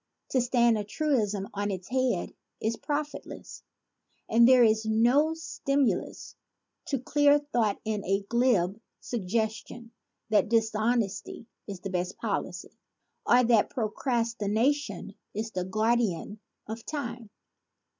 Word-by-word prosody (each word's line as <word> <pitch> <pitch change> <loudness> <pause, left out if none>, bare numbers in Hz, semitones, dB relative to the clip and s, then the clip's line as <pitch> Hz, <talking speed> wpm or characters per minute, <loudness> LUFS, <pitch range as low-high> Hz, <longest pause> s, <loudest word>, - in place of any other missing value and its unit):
To 260 - +2
stand 235 -2 +3
a - - -2
truism 210 -5 -1
on 205 0 -2
its 185 -2 -5
head 255 -7 0 0.3
is 220 +1 -1
profitless; 295 +4 -5 0.7
and 235 +1 +5
there 255 -1 +7
is 220 -1 +3
no 240 +9 +3
stimulus 275 - -1 0.5
to 275 - -1
clear 290 +3 +4
thought 240 -8 -1
in 215 -1 -1
the 195 +1 -1
glib 225 -5 +2 0.2
suggestion 225 +2 -3 0.4
that 215 0 +3
"Dishonesty 225 -1 0 0.2
is 195 -3 -7
the 195 - -5
best 180 0 -2
policy" - - -4 0.5
or 250 +1 +6
that 230 -3 +3
"procrastination 230 -1 -1 0.2
is 220 +2 -3
the 185 -3 -3
guardian 215 -1 0 0.3
of 225 +1 -6
time." 240 -7 -5
225 Hz, 115 wpm, -28 LUFS, 205-250 Hz, 0.7 s, there